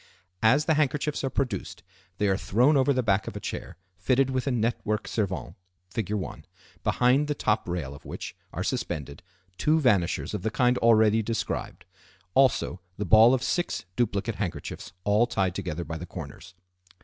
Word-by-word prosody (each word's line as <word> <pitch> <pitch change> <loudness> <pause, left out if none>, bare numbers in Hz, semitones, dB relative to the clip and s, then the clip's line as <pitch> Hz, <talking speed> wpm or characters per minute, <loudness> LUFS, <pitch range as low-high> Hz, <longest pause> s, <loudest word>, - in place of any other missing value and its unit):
As 135 +7 +4
the 160 - +3
handkerchiefs 150 0 0
are 135 - 0
produced 120 -9 -3 0.3
they 105 - +1
are 95 - +3
thrown 125 +9 +3
over 135 +1 +4
the 130 -2 +1
back 100 -1 +1
of - - -6
a - - -4
chair 90 - -6 0.2
fitted 130 +9 +1
with 130 +1 -1
a - - +2
network 115 -2 -1
servante 100 -4 -2 0.4
(Fig. 105 -4 -3
1), 100 -3 -4 0.4
behind 130 +4 +3
the 150 - -1
top 105 -7 0
rail 80 -6 -3
of 70 - -13
which - - -7 0.2
are - - -3
suspended 70 0 -3 0.4
two 155 +1 +3
vanishers 100 - +1
of 105 - -3
the 110 - 0
kind 125 +2 +2
already 110 -1 +5
described; 115 +1 -3 0.5
also 130 -8 +2 0.2
the 105 - -2
ball 110 +6 +7
of 125 - -3
six 175 - -1
duplicate 115 -2 -1
handkerchiefs 95 -5 -5
all 105 +4 +3
tied 95 -6 0
together 90 -3 -4
by 80 +2 -5
the 90 - -7
corners. 85 +1 -9
110 Hz, 175 wpm, -27 LUFS, 95-130 Hz, 0.5 s, ball